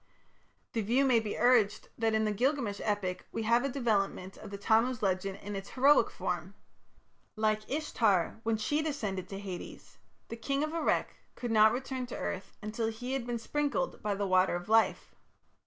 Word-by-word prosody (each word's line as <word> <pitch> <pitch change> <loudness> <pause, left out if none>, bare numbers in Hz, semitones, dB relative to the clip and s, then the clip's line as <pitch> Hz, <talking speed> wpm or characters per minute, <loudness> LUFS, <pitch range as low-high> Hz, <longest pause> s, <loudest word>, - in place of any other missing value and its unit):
The 225 - 0
view 240 +7 +2
may 250 -3 +5
be 215 -2 -4
urged 230 -4 +3
that 225 -1 +1
in 220 0 +2
the 215 - +1
Gilgamesh 240 -2 0
epic 205 -4 -2
we 225 - -3
have 235 +3 +3
a 275 - 0
development 205 -7 -1
of 215 - -10
the 200 - -6
Tammuz 225 +3 +2
legend 190 0 0
in 205 0 -5
its 195 0 -6
heroic 280 +3 +5
form. - - -4 0.8
Like 215 -1 0
Ishtar, 225 - +1
when 225 -1 0
she 290 +8 0
descended 210 - -3
to 195 - -5
Hades, 195 -3 -8 0.3
the 230 - -6
King 275 +5 -1
of 310 +1 -3
Erech 335 - 0 0.2
could 240 -2 -4
not 215 0 +6
return 260 0 -3
to - - -6
earth 190 0 -4
until 220 +2 -2
he 245 +4 -4
had 260 -3 -2
been 240 -1 -1
sprinkled 295 - -2
by 210 -1 -1
the 200 0 -1
water 185 -1 +3
of 175 0 -5
life. 225 +1 +2
220 Hz, 185 wpm, -31 LUFS, 200-255 Hz, 0.8 s, not